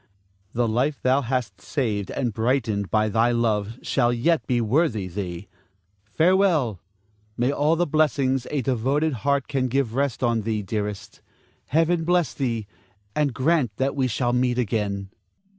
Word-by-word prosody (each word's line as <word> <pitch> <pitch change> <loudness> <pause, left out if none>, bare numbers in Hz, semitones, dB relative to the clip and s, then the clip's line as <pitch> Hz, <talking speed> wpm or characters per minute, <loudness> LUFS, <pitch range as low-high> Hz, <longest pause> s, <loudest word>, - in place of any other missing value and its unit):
The 120 0 +1
life 130 +6 0
thou 130 +2 +3
hast 120 -6 -3
saved 105 -9 -2
and 120 -5 -2
brightened 110 -3 0
by 110 0 +2
thy 115 +3 +2
love 115 -2 0
shall 120 -3 +2
yet 145 +7 +1
be 125 -2 +1
worthy 115 - +1
thee. 90 0 -5 0.6
Farewell! 160 - +2 0.6
May 125 +3 +2
all 150 +3 +2
the 175 +2 +1
blessings 140 -4 +1
a 140 -3 -1
devoted 135 +5 +1
heart 140 -1 +1
can 135 -3 0
give 130 -2 0
rest 135 -1 -1
on 120 -2 +2
thee, 110 -1 -2
dearest. 105 0 -4 0.5
Heaven 165 +3 +2
bless 175 -1 +1
thee, 115 -6 -2 0.5
and 150 -2 +1
grant 130 -3 +1
that 135 +1 0
we 135 -2 +1
shall 120 +1 0
meet 125 0 +1
again. 100 -4 -2
125 Hz, 150 wpm, -24 LUFS, 110-140 Hz, 0.6 s, thou